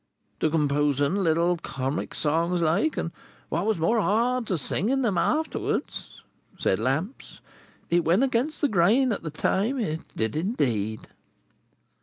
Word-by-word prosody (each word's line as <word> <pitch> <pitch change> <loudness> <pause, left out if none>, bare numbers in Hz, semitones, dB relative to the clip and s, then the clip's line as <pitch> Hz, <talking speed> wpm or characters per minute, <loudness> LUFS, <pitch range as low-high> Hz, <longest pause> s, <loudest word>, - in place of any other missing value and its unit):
"—To 155 - +2
composing 145 -1 +1
little 170 -1 +2
Comic 135 -1 -4
Songs 165 +4 +1
like—and 165 - 0 0.4
what 170 +6 -1
was 220 - +1
more 220 +8 +2
hard—to 230 -1 +1
singing 240 - 0
'em 205 -5 +1
afterwards," 310 - -2 0.3
said - - +1
Lamps, 155 - -3 0.5
"it 175 0 +3
went 175 +10 +3
against 270 +3 0
the 290 - +4
grain 225 +6 +3
at 205 - -2
that 155 -2 -7
time, 220 - 0
it 160 -8 -2
did 110 0 -1
indeed." 120 - -1
170 Hz, 130 wpm, -26 LUFS, 155-225 Hz, 0.5 s, the